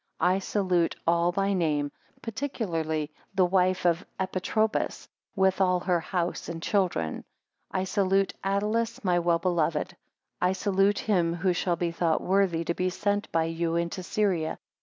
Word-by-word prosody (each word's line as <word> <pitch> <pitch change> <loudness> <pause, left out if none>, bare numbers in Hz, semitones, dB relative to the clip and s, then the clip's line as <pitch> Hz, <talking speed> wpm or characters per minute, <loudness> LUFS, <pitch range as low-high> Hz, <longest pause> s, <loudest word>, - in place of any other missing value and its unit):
8 - - +1
I 185 +2 +3
salute 185 -4 +1
all 170 +1 +3
by 195 +2 0
name; 150 -5 0 0.3
particularly 165 - -2 0.2
the 185 - +5
wife 185 0 +2
of 170 0 +2 0.2
Epitropus 190 +4 -1 0.3
with 190 -1 +2
all 180 -1 +3
her 175 -2 +1
house 175 0 -2
and 165 -1 -5
children. 170 - 0 0.5
I 185 - -1
salute 195 0 +1
Attalus 210 +4 0
my 180 -2 +3
well 170 -1 +2
beloved. 170 -1 0 0.5
9 180 - +4
I - - +1
salute 195 +1 +2
him 175 -5 +1
who 180 +1 +1
shall 175 0 0
be 170 0 -1
thought 165 -1 +1
worthy 185 -3 +2
to 170 - -1
be 185 +1 0
sent 205 +2 -1
by 165 -1 +2
you 165 0 -1
into 170 +2 -1
Syria. 180 -4 0
180 Hz, 160 wpm, -27 LUFS, 170-195 Hz, 0.5 s, the